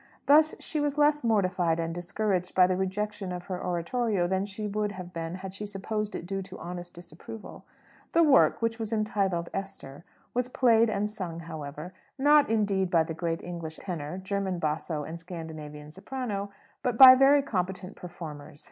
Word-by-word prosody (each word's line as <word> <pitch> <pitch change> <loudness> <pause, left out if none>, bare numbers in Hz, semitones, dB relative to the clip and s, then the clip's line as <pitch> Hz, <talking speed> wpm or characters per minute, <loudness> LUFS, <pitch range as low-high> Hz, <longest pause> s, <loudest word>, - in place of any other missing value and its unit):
Thus 310 +2 +5
she 310 - -3
was 290 0 -1
less 295 -1 +3
mortified 185 -7 +1
and 165 0 -2
discouraged 180 +1 -2
by 185 - +7
the 185 0 +1
rejection 190 +1 -3
of 180 0 -5
her 180 -1 -5
oratorio 180 +3 0
than 190 +2 0
she 210 +1 -5
would 210 0 -2
have 180 -2 -9
been 165 0 -4
had 190 0 -7
she 200 - -6
supposed 210 +1 -3
it - - -5
due 195 +2 -3
to 190 0 -10
honest 175 0 -7
disapproval. 175 +5 -10 0.5
The 335 - +5
work, 280 -5 +4
which 230 0 0
was 220 -1 -3
entitled 195 -5 0
"Esther," 180 -7 -6 0.3
was 250 0 0
played 230 -3 +4
and 210 0 0
sung, 185 -6 -5
however; 160 +1 -7 0.2
not 290 +1 +5
indeed 200 -4 +1
by 170 -3 +4
the 160 - -5
great 165 0 -3
English 170 -2 -6
tenor, 165 -3 -5
German 190 -1 -2
basso, 155 -1 -2
and 165 +3 -7
Scandinavian 155 -3 -8
soprano, 205 +1 -4 0.3
but 250 -4 -1
by 260 0 +12
very 275 +2 +5
competent 185 -4 -3
performers. 155 -4 -9
190 Hz, 175 wpm, -28 LUFS, 170-215 Hz, 0.5 s, by